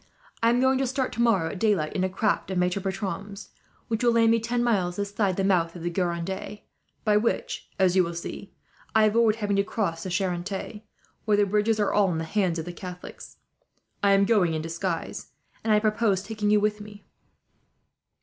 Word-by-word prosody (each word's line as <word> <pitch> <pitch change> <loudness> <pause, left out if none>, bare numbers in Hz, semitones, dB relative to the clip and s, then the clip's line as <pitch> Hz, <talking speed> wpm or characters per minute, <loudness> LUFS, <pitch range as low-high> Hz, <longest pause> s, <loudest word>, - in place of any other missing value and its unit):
I 230 - +4
am 240 +1 +3
going 260 0 +3
to 270 - +1
start 260 0 -1
tomorrow 225 -9 +2
at 200 - -7
daylight, 195 -8 +1
in 185 - -1
a 190 - +1
craft 200 +2 0
of 190 - -2
Maitre 180 +2 +1
Bertram's, 195 +1 -5 0.4
which 225 +1 -2
will 240 -1 +4
land 230 -1 +4
me 230 - +3
ten 240 +2 -1
miles 190 -7 +1
this 200 +1 -4
side 200 -4 +1
the 195 - +1
mouth 175 -3 +1
of 170 - -8
the 175 - -1
Gironde; 185 +3 -3 0.4
by 210 -2 +3
which, 225 +2 -2
as 190 -2 +3
you 185 - +5
will 170 0 -4
see, 170 - -7 0.4
I 220 - +6
avoid 215 0 +4
having 205 -3 -1
to 200 - +3
cross 190 -6 -2
the 185 - -5
Charente, 190 +3 -3 0.4
where 210 -2 +3
the 205 - +4
bridges 210 +2 +1
are 205 - +1
all 200 -3 +3
in 165 - -2
the 160 - -2
hands 180 0 0
of 160 - -4
the 175 - -6
Catholics. 180 0 -9 0.6
I 200 0 +4
am 195 0 +4
going 195 -7 +2
in 155 - -3
disguise, 165 +1 -4 0.3
and 225 - 0
I 210 - +5
propose 210 -3 +1
taking 210 0 -2
you 210 0 +5
with 210 0 0
me." 210 0 -12
200 Hz, 205 wpm, -26 LUFS, 180-215 Hz, 0.6 s, I